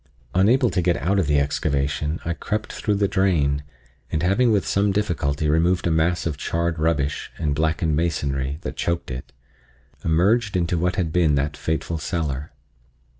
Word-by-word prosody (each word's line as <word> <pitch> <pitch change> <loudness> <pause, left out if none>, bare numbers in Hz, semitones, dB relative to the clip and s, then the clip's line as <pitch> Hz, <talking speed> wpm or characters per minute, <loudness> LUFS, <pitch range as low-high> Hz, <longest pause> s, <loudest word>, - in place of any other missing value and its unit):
Unable 115 +6 +4
to 90 - +1
get 85 0 +2
out 100 +3 +1
of 90 - +1
the 75 0 +3
excavation, 70 +2 -1
I 85 - 0
crept 105 +5 -3
through 105 - -1
the 100 0 +2
drain, 85 -8 +1 0.5
and 80 - -1
having 115 +7 +3
with 100 -3 +2
some 100 0 +2
difficulty 80 -8 0
removed 85 +4 +2
a 85 - +2
mass 80 +2 +1
of 80 -4 -2
charred 85 +1 -1
rubbish 75 -3 0
and 75 -3 0
blackened 80 +1 0
masonry 70 -4 -1
that - - -5
choked 85 -5 -2
it, 60 0 -7 0.7
emerged 100 +6 +2
into 85 0 0
what 90 +1 0
had 85 -4 -1
been 80 -5 +3
that 70 +2 -1
fateful 80 +1 -2
cellar. 75 -5 -3
85 Hz, 170 wpm, -23 LUFS, 75-95 Hz, 0.7 s, Unable